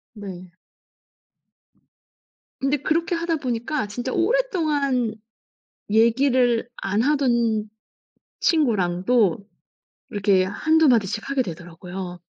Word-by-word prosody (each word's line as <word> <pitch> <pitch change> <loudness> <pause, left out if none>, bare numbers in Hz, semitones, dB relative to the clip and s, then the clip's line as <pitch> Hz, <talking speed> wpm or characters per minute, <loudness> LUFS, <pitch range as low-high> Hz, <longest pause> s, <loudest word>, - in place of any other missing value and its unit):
네. 185 -4 -9 2.1
근데 275 +2 +1
그렇게 335 +5 0
하다 335 -1 -1
보니까 250 -1 -2
진짜 245 +5 -4
오랫동안 310 - 0 0.7
얘기를 240 +1 +3
안 205 +3 -1
하던 235 -6 +1 0.7
친구랑도 210 - +2 0.7
이렇게 195 -3 +2
1-2 315 +11 +2
마디씩 215 -1 +1
하게 275 -2 +1
되더라고요. 175 0 -8
235 Hz, 195 characters per minute, -23 LUFS, 200-285 Hz, 2.1 s, 얘기를